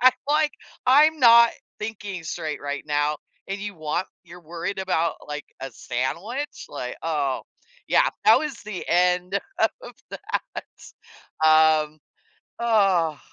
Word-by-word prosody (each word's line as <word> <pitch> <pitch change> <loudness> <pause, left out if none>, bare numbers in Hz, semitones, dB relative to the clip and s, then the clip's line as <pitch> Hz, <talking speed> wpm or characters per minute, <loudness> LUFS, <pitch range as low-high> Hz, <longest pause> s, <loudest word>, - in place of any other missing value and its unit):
I'm 255 -1 +8 0.2
like. 300 0 +2 0.3
"I'm 300 +5 +6
not 235 -1 +8 0.3
thinking 205 -4 -5
straight 155 -1 -4
right 145 0 -4
now, 150 0 +1 0.3
and 195 0 -4
you 205 -1 -5
want 155 +3 -2 0.2
you're 175 +1 -13
worried 170 +4 -5
about, 170 -4 0
like, 150 0 -5 0.2
a 135 0 -5
sandwich?" 175 - -4
Like, 125 -3 -6
oh, 145 -5 -1 0.5
yeah, - - +4 0.2
that - - +7
was 300 -4 -3
the 210 -4 -6
end 180 +2 +2 0.4
of - - -10 0.2
that. - - -5 0.8
Um, 155 -1 +4 0.6
oh. 195 -9 +2
180 Hz, 125 wpm, -24 LUFS, 155-220 Hz, 0.8 s, I'm